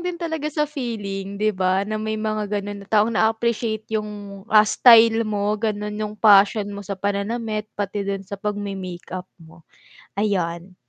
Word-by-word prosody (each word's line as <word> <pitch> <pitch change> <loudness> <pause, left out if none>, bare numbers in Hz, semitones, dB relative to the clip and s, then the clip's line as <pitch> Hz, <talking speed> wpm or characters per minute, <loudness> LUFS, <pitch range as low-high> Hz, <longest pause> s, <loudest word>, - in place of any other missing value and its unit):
din 360 0 -3
talaga 320 -3 -3
sa 300 0 0
feeling, 205 -9 -5
'di 215 +1 +1
ba? 185 0 +1
Na 215 +1 -3
may 220 0 -2
mga 215 -1 -2
ganun 205 0 -4
na 200 - -13
taong 215 +1 +3
na-aappreciate 220 0 0
'yung, 215 -1 -1 0.4
ah, 215 -2 +6
style 230 0 +6
mo 205 -1 0
ganon, 210 -2 -2
'yung 210 0 -4
passion 205 0 +5
mo 200 - -6
sa 200 -1 -5
pananamit 210 +2 -2
pati 205 0 -3
dun 195 -1 -3
sa 200 +1 -7
pag-me-make-up 190 -3 -5 0.2
mo, 160 +1 -17 0.6
ayan. 185 -3 -1
210 Hz, 160 wpm, -22 LUFS, 200-220 Hz, 0.6 s, ah